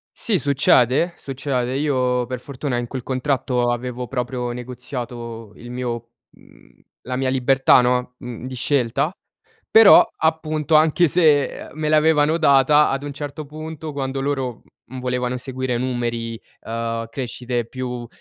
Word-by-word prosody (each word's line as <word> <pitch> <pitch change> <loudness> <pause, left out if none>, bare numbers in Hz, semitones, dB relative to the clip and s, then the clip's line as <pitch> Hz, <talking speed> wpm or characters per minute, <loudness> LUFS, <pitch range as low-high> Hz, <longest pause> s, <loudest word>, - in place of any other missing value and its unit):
Sì, 210 -5 +1
succede, 140 +2 +3
succede. 130 -2 -3
Io 125 -4 +1
per 125 -1 -5
fortuna 135 -1 -4
in 120 0 -3
quel 130 -1 -6
contratto 130 -2 0
avevo 125 +1 -4
proprio 125 -1 -3
negoziato 120 -3 -7
il 120 +1 -10
mio 120 -2 -4 0.2
mhmm, - - -22 0.2
la 125 0 -4
mia 130 0 0
libertà, 130 0 +4
no, 125 0 0
mhmm, 120 0 -8
di 130 - -6
scelta, 125 +3 +1 0.6
però 220 -2 +9
appunto 160 -1 0
anche 160 +3 +5
se, 150 -4 +4 0.2
ehm, - - -13
me 155 0 -2
l'avevano 155 +1 +3
data 145 0 +5
ad 135 +1 -2
un 145 0 -5
certo 145 +1 -6
punto, 155 +1 -7
quando 135 -1 -3
loro, 135 -4 -2 0.2
mhmm, 130 +1 -8
volevano 125 0 -1
seguire 130 -1 -3
numeri, 120 -2 -3 0.2
ehm, 115 0 -3
crescite 120 -1 -3
più, 125 -1 -5
130 Hz, 140 wpm, -21 LUFS, 125-145 Hz, 0.6 s, però